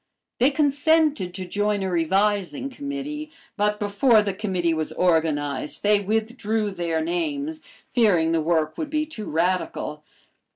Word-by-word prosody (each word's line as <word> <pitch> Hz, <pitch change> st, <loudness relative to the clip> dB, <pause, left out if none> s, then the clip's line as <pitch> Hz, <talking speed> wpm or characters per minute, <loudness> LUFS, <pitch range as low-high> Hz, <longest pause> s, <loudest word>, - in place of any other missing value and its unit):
They 255 Hz, +3 st, +5 dB
consented 290 Hz, -, +2 dB
to 185 Hz, -1 st, -4 dB
join 205 Hz, +2 st, 0 dB
a 190 Hz, -, -2 dB
revising 195 Hz, -, +1 dB
committee, 285 Hz, +2 st, -5 dB, 0.3 s
but 210 Hz, -1 st, +1 dB
before 210 Hz, +2 st, +3 dB
the 200 Hz, -2 st, -2 dB
committee 185 Hz, -4 st, -1 dB
was 155 Hz, -1 st, -2 dB
organized 150 Hz, -5 st, 0 dB
they 210 Hz, 0 st, +4 dB
withdrew 220 Hz, 0 st, -1 dB
their 170 Hz, -3 st, -1 dB
names, 155 Hz, -2 st, -2 dB, 0.3 s
fearing 180 Hz, -9 st, +3 dB
the 165 Hz, -1 st, +2 dB
work 155 Hz, -1 st, 0 dB
would 305 Hz, -, -3 dB
be 305 Hz, 0 st, 0 dB
too 225 Hz, -9 st, -7 dB
radical. 165 Hz, -2 st, -1 dB
200 Hz, 135 wpm, -24 LUFS, 165-235 Hz, 0.3 s, They